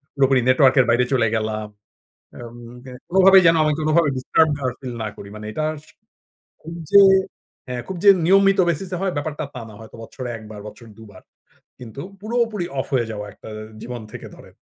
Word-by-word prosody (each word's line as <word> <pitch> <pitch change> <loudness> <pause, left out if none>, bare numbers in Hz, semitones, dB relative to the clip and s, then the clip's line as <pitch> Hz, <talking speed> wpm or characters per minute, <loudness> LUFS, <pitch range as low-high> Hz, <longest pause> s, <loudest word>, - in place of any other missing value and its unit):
পুরোপুরি 135 -1 +3
নেটওয়র্ক 130 +1 +4
এর 125 - +5
বাইরে 120 +1 +3
চলে 115 -3 +2
গেলাম। 110 -1 -3 0.7
আ - - -11
উম 120 +1 -13 0.5
কোনোভাবেই 190 +1 +6
যেন 165 - +5
আমি 150 -1 +1
কোনোভাবে 155 0 +2
ডিস্টার্ব 155 +5 +2
না 140 - -9 0.2
ফিল 130 -3 -7
না - - -3
করি 100 - -10
মানে 105 0 -9
এটা 155 +7 -3 1.0
খুব 165 - -10 0.2
যে 200 - +8 0.7
হ্যাঁ। 125 -1 -4
খুব 190 - -6
যে - - +6 0.2
নিয়মিত 195 +1 +4
বেসিসে 180 +3 -2
হয় 190 -2 -1
ব্যাপারটা 150 +1 -4
তা 125 - -7
না 105 - -13
হয়তো 110 +1 -13
বছরে 125 +2 -8
১বার 105 -1 -11
বছরে 110 +2 -12
২বার 100 -4 -14 0.6
কিন্তু 125 +3 -9 0.2
পুরোপুরি 225 -4 -1
অফ - - -2
হয়ে 120 -3 +1
যাওয়া 105 -1 -6
একটা - - -13 0.3
জীবন 120 -2 -7
থেকে 120 - -9
ধরেন। - - -17
130 Hz, 180 wpm, -21 LUFS, 115-170 Hz, 1.0 s, যে